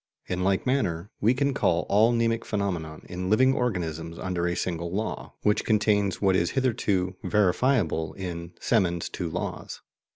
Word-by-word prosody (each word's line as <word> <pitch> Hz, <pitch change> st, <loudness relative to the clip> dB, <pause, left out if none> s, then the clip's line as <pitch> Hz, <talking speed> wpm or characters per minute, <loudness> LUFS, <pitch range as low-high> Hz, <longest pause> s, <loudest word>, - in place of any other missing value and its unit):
In 90 Hz, 0 st, -2 dB
like 95 Hz, 0 st, +1 dB
manner, 100 Hz, -9 st, 0 dB
we 115 Hz, +5 st, +3 dB
can 140 Hz, +1 st, +1 dB
collect 85 Hz, -9 st, +1 dB
all 110 Hz, +4 st, +4 dB
mnemic 115 Hz, -1 st, +1 dB
phenomena 90 Hz, -7 st, -3 dB
in 90 Hz, +1 st, -4 dB
living 130 Hz, +5 st, +5 dB
organisms 85 Hz, -9 st, -2 dB
under 90 Hz, -2 st, -2 dB
a 85 Hz, -, -1 dB
single 85 Hz, -1 st, -3 dB
law, 105 Hz, +4 st, -4 dB
which 105 Hz, 0 st, +2 dB
contains 105 Hz, -2 st, +2 dB
what 95 Hz, -2 st, +3 dB
is 85 Hz, -1 st, +2 dB
hitherto 100 Hz, -8 st, 0 dB
verifiable 100 Hz, -, +1 dB
in 85 Hz, -2 st, -6 dB
Semon's 90 Hz, -7 st, +1 dB
two 90 Hz, -3 st, -4 dB
laws. -, -, -5 dB
95 Hz, 155 wpm, -26 LUFS, 85-110 Hz, -, living